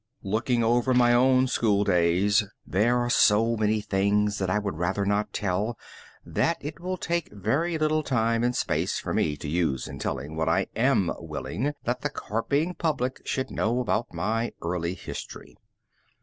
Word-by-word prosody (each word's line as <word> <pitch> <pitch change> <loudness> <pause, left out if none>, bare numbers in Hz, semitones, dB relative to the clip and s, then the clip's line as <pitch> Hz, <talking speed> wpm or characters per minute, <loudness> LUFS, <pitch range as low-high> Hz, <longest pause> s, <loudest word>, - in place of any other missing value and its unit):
Looking 115 +4 0
over 120 +3 +2
my 120 -1 +5
own 130 +1 +4
school 105 -5 +2
days, 90 +3 +3 0.2
there 115 +6 +2
are 120 0 0
so 115 +2 +4
many 110 0 +1
things 105 +1 +1
that 95 -1 -1
I 95 - +2
would 100 -6 -3
rather 95 +3 0
not 105 +1 0
tell, 105 +4 -1 0.5
that 165 - 0
it 150 +2 -7
will 185 +1 -3
take 170 -1 -2
very 135 - -1
little 155 0 +1
time 115 -4 +1
and 120 0 +1
space - - 0
for - - -4
me 75 -1 0
to 75 - -7
use 75 -5 0
in - - -8
telling 70 +4 -4
what 80 0 0
I 95 +4 +2
am 115 -5 +2
willing 140 +7 -3
that 125 +1 -2
the 145 - -1
carping 140 - -1
public 145 -7 -2
should 130 - -2
know 115 +3 0
about 120 -1 -1
my 115 +2 -1
early 85 +1 -2
history. - - -8
110 Hz, 170 wpm, -26 LUFS, 100-130 Hz, 0.5 s, my